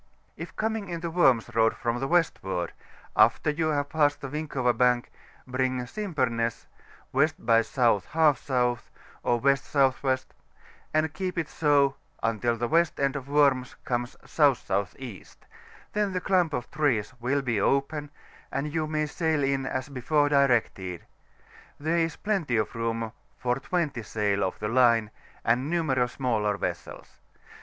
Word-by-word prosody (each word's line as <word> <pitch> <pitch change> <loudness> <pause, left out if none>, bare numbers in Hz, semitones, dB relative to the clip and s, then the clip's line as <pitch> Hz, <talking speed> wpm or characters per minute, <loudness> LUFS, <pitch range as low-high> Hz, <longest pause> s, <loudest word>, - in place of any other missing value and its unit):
K - - -6
coining 220 -3 -2
into 170 -1 -4
Worms 135 -10 +3
Road 115 0 +3
from 120 0 -2
the 135 - -2
westward, 95 - 0 0.4
after 150 - +4
vou 160 +1 0
have 145 -1 0
passed 145 -2 +2
the 135 - -6
Winkova 135 -5 -1
Bank, 125 0 +2 0.3
bring 130 0 -1
Simpemess 125 - -2 0.5
W. 140 +3 +5
by 115 -1 +3
S. 115 -1 -5
J 120 -6 +4 0.2
S. 155 -3 +3
or 125 -2 +2 0.6
W.S.W., 135 0 +2 0.7
and 155 -1 +1
keep 185 +3 -4
it 165 -3 -1
so 145 -3 +2 0.3
until 115 +1 0
the 120 +1 -1
west 165 +3 +2
end 140 -1 +1
of 140 -1 -6
Worms 140 -3 +3
comes 120 0 -2
S.S.E., 120 - 0 0.7
then 205 -2 0
the 180 - 0
clump 180 -5 +2
of 125 - -4
trees 130 -8 0
will 135 +4 0
be 115 -6 0
open, 145 +4 0 0.4
and 145 +2 -3
you 160 -1 0
may 155 0 0
sail 155 -1 0
in 135 -1 0
as 130 0 -3
before 145 +2 +1
directed; 120 - +1 0.7
there 160 +3 +1
is 165 -1 0
plenty 185 - -1
of 110 - -1
room 115 -1 -2 0.3
for 125 0 0
20 155 -7 -1
sail 100 -1 0
of 95 - -2
the 105 - -3
line, 115 -2 +3 0.3
and 125 +5 +2
numerous 135 -8 +1
smaller 110 -6 0
vessels. - - -6
135 Hz, 145 wpm, -27 LUFS, 120-155 Hz, 0.7 s, W